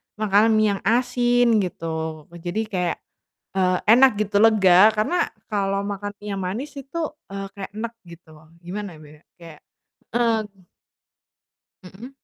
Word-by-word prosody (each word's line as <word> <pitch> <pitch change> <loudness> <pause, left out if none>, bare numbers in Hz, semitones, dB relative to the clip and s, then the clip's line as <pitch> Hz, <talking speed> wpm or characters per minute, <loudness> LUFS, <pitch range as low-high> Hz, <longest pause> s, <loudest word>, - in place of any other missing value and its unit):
makanan 215 +1 +3
mie 215 0 +3
yang - - -20
asin 245 -1 +3
gitu. 160 -4 -4 0.2
Jadi 175 +6 -3
kayak, 180 -3 -1 0.6
eee, 185 -1 +2
enak 255 +5 +7
gitu, 205 0 +1
lega, 205 -2 +6
karena 220 +12 0 0.2
kalau 200 -1 -1
makan 205 0 -4
mie 210 - -9
yang 195 - -4
manis 235 +12 -4
itu, 275 +4 -7 0.3
eee, 195 0 -5
kayak 200 -1 -7
enek 235 +1 -4 0.2
gitu. 170 -1 -15 0.3
Gimana 180 0 -7
bilangnya, 150 +1 -16 0.2
kayak, 165 -2 -13 0.5
eee 235 -2 +2 1.5
Mhm. 195 +7 -11
205 Hz, 130 wpm, -23 LUFS, 180-225 Hz, 1.5 s, enak